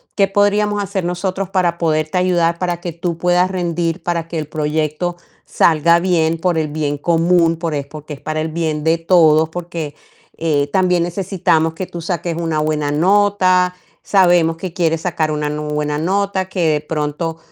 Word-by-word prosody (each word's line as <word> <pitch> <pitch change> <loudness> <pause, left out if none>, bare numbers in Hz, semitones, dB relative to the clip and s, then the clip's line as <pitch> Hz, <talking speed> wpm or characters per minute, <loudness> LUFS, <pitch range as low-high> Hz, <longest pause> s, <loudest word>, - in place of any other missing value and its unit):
"¿Qué 200 -2 +3
podríamos 205 +1 +1
hacer 195 -2 -3
nosotros 185 +1 -2
para 180 -3 +1
poderte 155 +1 0
ayudar, 170 -2 +1
para 175 -1 -2
que 175 - -4
tú 170 0 -3
puedas 180 +1 +2
rendir, 170 -2 -2
para 170 -2 -2
que 165 -1 -5
el 150 - -5
proyecto 155 +3 -2 0.3
salga 170 +1 +3
bien 165 -2 +1
por 175 -1 0
el 155 - -1
bien 145 -1 -2
común, 165 +1 +2
por 165 -2 -3
es 140 -1 -3
porque 150 0 -9
es 140 - -11
para 155 0 -3
el 160 - -2
bien 155 -2 -2
de 165 +1 +2
todos, 160 -2 +4
porque, 165 -3 -6 0.4
eh, 145 -3 0
también 180 -2 +2
necesitamos 170 -3 0
que 185 +2 -5
tú 170 - -7
saques 170 -1 -3
una 165 -2 -1
buena 150 -1 -1
nota, 185 +1 +3 0.3
sabemos 175 -4 +3
que 180 -1 -6
quieres 165 -3 0
sacar 160 -3 -1
una 150 -1 -2
nu 150 0 -4
buena 150 0 -1
nota, 190 +3 0
que 175 -4 0
de 150 -1 +1
pronto 155 +2 -3
170 Hz, 180 wpm, -18 LUFS, 155-180 Hz, 0.4 s, todos